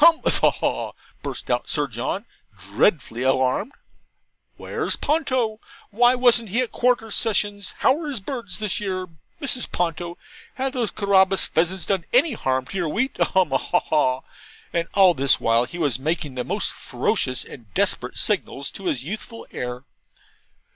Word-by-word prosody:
'Hum 330 -1 +8
a - - +4
ha - - +4
a - - +4
haw!' - - -2 0.3
burst - - -4
out - - 0
Sir - - +1
John, - - -4 0.3
dreadfully 135 - 0
alarmed. 130 - +1 0.9
'Where's - - 0
Ponto? 260 -8 0 0.3
Why 240 +4 +4
wasn't 240 -3 +4
he 235 +7 +1
at 250 - -3
Quarter 240 -3 +1
Sessions? 205 -3 0
How 265 - +4
are 310 - -5
his 275 -6 -1
birds 230 -2 -4
this 210 -2 -1
year, 185 -3 -3 0.3
Mrs. 265 -5 +2
Ponto 170 0 -2 0.4
have 265 0 -2
those 240 -5 -1
Carabas 195 -2 +3
pheasants 175 +3 0
done 190 -4 0
any 265 +4 +5
harm 130 - -1
to 195 - -6
your 175 -4 0
wheat? 240 - -1
a - - +5
hum 185 -7 +1
a 135 - +3
ha - - +1
a - - +4
haw!' 130 -4 +1 0.5
and 170 -1 0
all 190 -3 +7
this 135 -2 +3
while 115 +1 +2
he 175 - -8
was 145 -7 0
making 150 -1 -2
the 125 -1 -3
most - - -1
ferocious 130 0 -1
and 115 -6 -13
desperate - - 0
signals 140 - 0
to 195 - -10
his 130 -8 0
youthful 215 - -7
heir. 125 +1 -5
190 Hz, 175 wpm, -23 LUFS, 145-235 Hz, 0.9 s, Hum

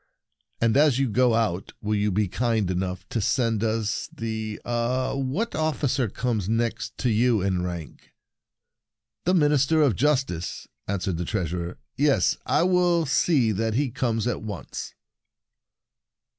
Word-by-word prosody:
And, 115 -1 +2
as 145 -3 +5
you 135 0 +2
go 120 +1 +3
out, 105 -5 -1
will 105 +1 -2
you 105 0 +1
be 105 +2 +1
kind 110 -1 0
enough 90 0 -3
to 115 - -1
send 115 -1 +1
us 110 -1 -1
the 110 -1 -4
— - - -33
ah, 120 +2 0
what 135 - -2
officer 145 -5 0
comes 110 -4 -2
next 115 0 -1
to 125 - 0
you 110 -2 +2
in 95 -2 0
rank?" 85 -3 -6 1.2
"The 180 +2 +3
Minister 150 -1 +3
of 130 -9 +3
Justice," 130 - -1 0.2
answered 95 -3 -1
the 90 - -3
Treasurer; 90 -3 -3
" - - -52
yes, 140 - +3
I - - +3
will 175 -2 +3
see 135 -5 +2
that 110 +2 -1
he 135 -1 +1
comes 115 -3 -1
at 120 -3 -1
once." 105 -5 -6
115 Hz, 150 wpm, -25 LUFS, 105-135 Hz, 1.2 s, as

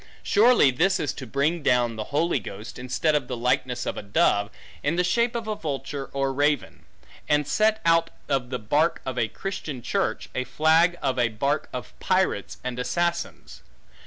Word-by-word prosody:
Surely 220 - +5
this 180 +9 +2
is 145 - -1
to 130 - -8
bring 145 +7 0
down 120 -4 +2
the 110 -1 -4
Holy 150 0 +1
Ghost, 105 +3 -9
instead 130 +5 0
of 145 -4 0
the 125 - -4
likeness 125 +1 0
of - - -3
a - - -3
dove, 100 0 +2 0.3
in 145 +4 0
the 180 - +2
shape 235 +6 +1
of 230 -2 -3
a 215 - -1
vulture 140 -4 -5
or 135 -1 -1
raven; 145 -1 0 0.4
and 150 -1 +2
set, 215 0 +2
out 165 0 +4 0.2
of 135 -3 -1
the 125 - -2
bark 145 +9 +1
of 130 -1 -3
a 115 - +2
Christian 155 - -5
church, - - -1
a 130 - -1
flag 160 +7 +3
of 130 -1 0
a 120 - +4
bark 140 +7 -1
of - - -7
pirates, - - 0
and 125 -1 -4
assassins. 170 +6 -2
140 Hz, 185 wpm, -25 LUFS, 125-170 Hz, 0.4 s, Surely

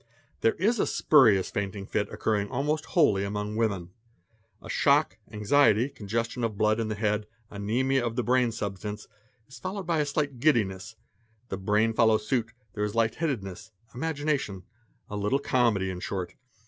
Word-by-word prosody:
There 115 - +2
is 220 +6 +1
a - - +2
spurious 110 -11 +4
fainting 100 0 -3
fit 105 +1 -2
occurring 105 -2 -1
almost 150 +4 -1
wholly 105 - +3
amon 105 +1 -3
o - - -5
women. 100 -6 -1 0.7
A - - -12
shock, 95 - +2
anxiety, 110 +2 +3
congestion 115 0 -3
of 110 -3 -2
blood 110 +2 +2
in 115 - -1
the 110 - -3
head, 105 0 -1 0.2
anzmia 125 +7 0
of 115 -1 -2
the 125 - 0
brain 125 -1 +2
substance, 105 0 -5 0.4
is 135 - -13
followed 190 +1 -5
by 165 -2 +1
a 150 - +2
slight 145 -3 -2
giddiness; 105 -10 +1 0.5
the 95 - -3
brain 105 +3 +1
follows 110 -2 +3
suit, 115 -3 0 0.2
there 105 - -2
is 105 +1 -2
light 115 -1 +2
headedness, 110 - -3 0.2
imagination, 140 - -2 0.4
a 105 - -6
little 105 +6 +1
comedy 115 -9 +1
in 90 - -6
short. 90 -1 -4
110 Hz, 165 wpm, -27 LUFS, 100-130 Hz, 0.7 s, spurious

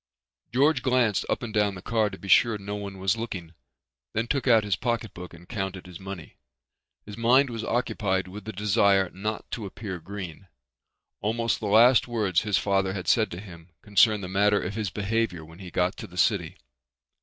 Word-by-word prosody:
George 140 +2 +3
glanced 125 -5 +2
up - - -1
and 115 -2 -5
down 105 -2 +2
the 90 - -9
car 110 -2 +1
to - - -9
be 100 - -10
sure 115 +3 +5
no 100 0 -5
one 100 -1 -6
was 95 +2 +1
looking, 95 -8 -6 0.6
then 110 +1 0
took 135 +2 -1
out 115 -3 +6
his 100 -3 0
pocket 115 0 -2
book 90 0 -9
and 85 +1 -15
counted 95 -4 -4
his 90 -2 -10
money. 95 -4 -9 0.7
His 105 +1 -9
mind 125 +3 +4
was 115 -1 -4
occupied 100 -6 -1
with 100 +3 -10
a - - -3
desire 100 -2 +2
not 105 +3 -4
to 110 -4 -4
appear 95 -2 -6
green. 95 0 -8 0.7
Almost 115 +2 0
the 105 - -3
last 115 +6 +6
words 105 -7 +1
his 105 -4 +1
father 95 +2 +1
had 95 -2 -5
said 110 -2 +3
to 85 - -7
him 85 -4 -12
concerned 105 0 +4
the - - -4
matter 100 +2 +3
of 95 - -4
his 105 -2 -2
behavior 100 -3 -1
when 80 +3 -15
he 95 -2 -8
got 90 +1 0
to - - -7
the - - -14
city. - - +1
105 Hz, 200 wpm, -26 LUFS, 95-115 Hz, 0.7 s, out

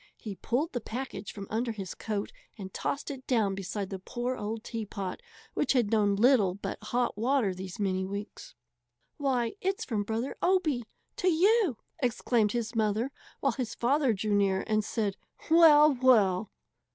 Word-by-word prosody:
He 215 -4 -6
pulled 245 - -1
the 245 - -2
package 220 -4 -5
from 200 -1 -7
under 230 +2 0
his 195 -4 -6
coat 210 -2 -3 0.3
and 190 -3 -8
tossed 285 - -3
it 265 -2 -9
down 220 -6 +2
beside 195 +1 -4
the 190 - -4
poor 240 +6 -3
old 220 0 -4
teapot, 205 - -5 0.3
which - - +1
had 240 -5 +2
known 205 -2 +3
little 210 -4 +4
but 200 - -5
hot 245 +2 0
water 240 -4 +2
these 185 0 -7
many 190 -2 0
weeks. 200 -4 -7 0.6
"Why, 255 -5 0
it's 385 +1 -1
from 220 -5 -1
Brother 225 +5 -3
Obie 330 -10 +2 0.3
to 370 - 0
you!" 370 - +3 0.2
exclaimed 240 -4 +1
his 235 -1 -2
mother, 220 +3 0 0.3
while - - +3
his 240 -4 -4
father 270 +2 +2
drew 210 0 -1
near 195 -2 +2
and 215 0 +1
said, 205 -2 -2 0.3
"Well, 305 -3 +8
well!" 210 -6 +4
225 Hz, 165 wpm, -29 LUFS, 200-260 Hz, 0.6 s, Well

